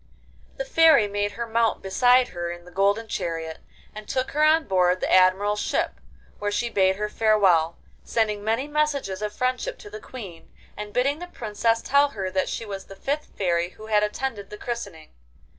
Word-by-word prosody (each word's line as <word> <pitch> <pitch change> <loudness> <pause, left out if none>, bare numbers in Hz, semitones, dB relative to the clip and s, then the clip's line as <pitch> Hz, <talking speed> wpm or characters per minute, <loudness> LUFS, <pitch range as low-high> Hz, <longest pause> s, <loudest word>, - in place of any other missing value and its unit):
The - - -3
Fairy 325 - +5
made 205 0 -2
her 235 +3 -4
mount 230 0 0
beside 245 +6 +4
her 175 -1 -4
in 175 0 -9
the 180 - -14
golden 200 +4 +1
chariot, 165 -4 -4 0.3
and 215 0 -9
took 255 0 -1
her 300 +1 +1
on 315 +1 +5
board 185 -2 +2
the - - -1
Admiral's 190 +3 +4
ship, - - -1 0.4
where 205 - -1
she 235 +3 -1
bade 190 -1 +3
her 210 +2 -2
farewell, 195 -7 +3 0.3
sending 210 -3 -1
many 225 +6 0
messages 290 -10 -1
of 210 0 -2
friendship 255 - -2
to 415 -4 -12
the 425 +1 -8
Queen, 195 - -10 0.2
and 210 0 -7
bidding 275 +6 +1
the 355 - -7
Princess 230 -5 -1
tell 280 +1 +4
her 190 -1 -2
that 185 0 0
she 230 - -4
was 195 -2 -6
the 195 - -12
fifth 285 +9 -3
Fairy 175 -2 0
who 215 +3 -13
had 215 -1 +2
attended 210 -1 -3
the 210 - -8
christening. 200 -10 -6
210 Hz, 190 wpm, -24 LUFS, 190-255 Hz, 0.4 s, Fairy